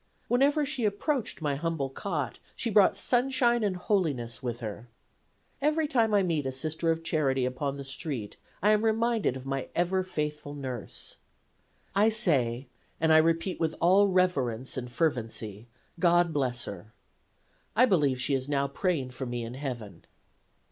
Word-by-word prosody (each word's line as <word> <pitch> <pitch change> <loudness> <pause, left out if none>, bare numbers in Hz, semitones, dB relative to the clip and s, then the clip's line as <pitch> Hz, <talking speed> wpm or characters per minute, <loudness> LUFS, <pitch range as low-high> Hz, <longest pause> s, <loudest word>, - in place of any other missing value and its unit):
Whenever 285 +5 +3
she 275 -4 -1
approached 215 - -1
my 145 -2 +1
humble 155 -1 -2
cot 145 - -4 0.2
she 230 - -2
brought 205 -2 +5
sunshine 240 +1 +2
and 200 -3 0
holiness 145 - -1
with 120 -2 -4
her. 110 +1 -7 0.7
Every 305 +2 +2
time 230 -6 +2
I 205 -2 +4
meet 160 -6 0
a - - -1
Sister 155 +5 -2
of 165 0 0
Charity 135 -6 +1
upon 135 +2 -2
the 140 - -6
street 135 - -4 0.3
I 210 - +5
am 215 0 +3
reminded 225 - +1
of 130 - -10
my 135 -1 -3
ever 180 +2 +1
faithful 150 -5 -4
nurse. 130 -5 -6 0.8
I 205 +3 +4
say, 140 - +2 0.3
and 160 0 +4
I 155 - +8
repeat 165 +3 +1
with 160 -1 0
all 190 +4 +5
reverence 135 - 0
and 125 -1 -5
fervency, 115 - -2 0.3
God 175 -1 +3
bless 125 -4 0
her. 100 +2 -9 0.8
I 250 - +6
believe 145 - +2
she 125 +3 +2
is 135 +1 -1
now 140 -1 +1
praying 140 -3 -1
for 130 +1 -5
me 120 -1 -3
in 115 +1 -6
heaven." 125 -6 -6
155 Hz, 160 wpm, -28 LUFS, 130-200 Hz, 0.8 s, I